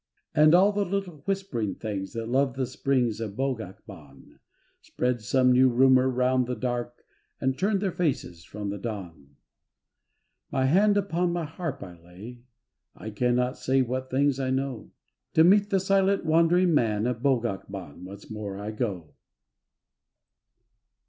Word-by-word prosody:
And 155 +1 +6
all 195 +3 +5
the 205 0 0
little 195 -3 -3
whispering 190 - -2
things 100 -4 -5
That 115 -1 -4
love 130 +1 +1
the 135 -1 -1
springs 125 -3 -1
of 105 -3 -5
Bogac 115 -7 -4
Ban, 75 -9 -15 0.4
Spread 125 -2 -2
some 125 +3 +2
new 130 +1 +5
rumour 130 +1 +4
round 125 0 +1
the 125 - -2
dark 120 -1 -4 0.3
And 130 0 0
turned 195 +4 0
their 195 -3 0
faces 135 - -2
from 100 +4 -6
the 100 - -5
dawn. 85 -10 -8 1.2
My 130 - +1
hand 200 +8 +4
upon 180 -3 0
my 170 -2 -2
harp 150 -3 -5
I 90 -2 -11
lay, 100 +8 -12 0.5
I 110 - -8
cannot 125 +3 0
say 130 0 +2
what 130 +1 -4
things 140 +1 +1
I 130 -1 -1
know; 130 -3 -3 0.5
To 160 - +7
meet 200 +4 +5
the 195 -2 +2
Silent 195 0 +1
Wandering 170 +2 +3
Man 110 -6 +1
Of 120 -2 -2
Bogac 120 -9 0
Ban 90 -4 -9
once 100 +2 -10
more 105 -3 -6
I 105 +2 -5
go. 95 - -4
125 Hz, 155 wpm, -26 LUFS, 105-160 Hz, 1.2 s, To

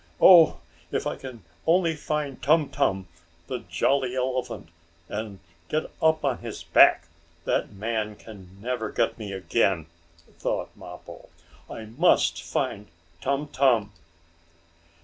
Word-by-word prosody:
"Oh, 170 -4 +7 0.3
if - - -1
I - - -2
can 125 -6 -10 0.2
only 165 -1 +3
find 150 -3 -3
Tum 155 0 +3
Tum, 110 -9 0 0.4
the 125 +7 -4
jolly 130 -2 +1
elephant, 130 -8 -3 0.4
and 105 0 -5 0.3
get 155 +1 -2
up 160 -2 +3
on 130 -3 0
his 115 -2 -7
back, - - +5 0.4
that - - 0
man 105 +1 -3
can 95 -4 -13
never 120 +1 -3
get - - 0
me 105 -2 -6
again!" 95 -2 0 0.5
thought - - -3
Mappo. - - -12 0.4
"I 110 - -7
must 130 +12 +2
find 105 +1 -3 0.3
Tum 140 +2 -1
Tum!" 120 -7 +2
125 Hz, 125 wpm, -26 LUFS, 105-140 Hz, 0.5 s, Oh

